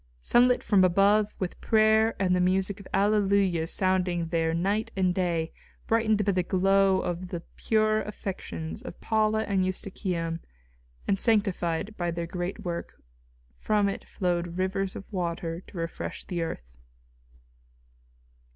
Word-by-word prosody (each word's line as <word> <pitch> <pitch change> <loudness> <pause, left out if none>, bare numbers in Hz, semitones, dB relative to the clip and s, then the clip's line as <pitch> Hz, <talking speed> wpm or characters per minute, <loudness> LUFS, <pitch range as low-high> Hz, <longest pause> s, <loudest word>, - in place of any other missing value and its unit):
Sunlit 245 - +4
from 200 -3 +4
above, 200 +4 +3
with 185 -2 -4
prayer 220 0 +4
and 185 -2 +2
the 180 - +2
music 190 +2 +1
of 200 - -11
alleluias 195 -5 +2
sounding 180 -3 0
there 165 -1 +1
night 200 +7 0
and 185 -1 +2
day, 170 -3 -1 0.3
brightened 220 -2 +2
by 200 - +3
the 185 -1 +1
glow 195 +1 +3
of 175 +1 -3
the 175 -1 -5
pure 215 -1 +2
affections 195 -3 -6
of 255 - -9
Paula 220 0 +1
and 195 -3 +1
Eustochium 180 -3 -3 0.7
and 195 0 +1
sanctified 200 -3 +1
by 175 -1 -1
their 170 0 -3
great 180 +4 -4
work, 170 -1 -5 0.6
from 210 -1 +2
it 195 - -3
flowed 175 -1 -2
rivers 190 +1 -1
of 200 - -10
water 170 -2 -3
to 190 - -11
refresh 165 0 -4
the 175 -3 -3
earth. 60 - -6
190 Hz, 140 wpm, -27 LUFS, 175-205 Hz, 0.7 s, Sunlit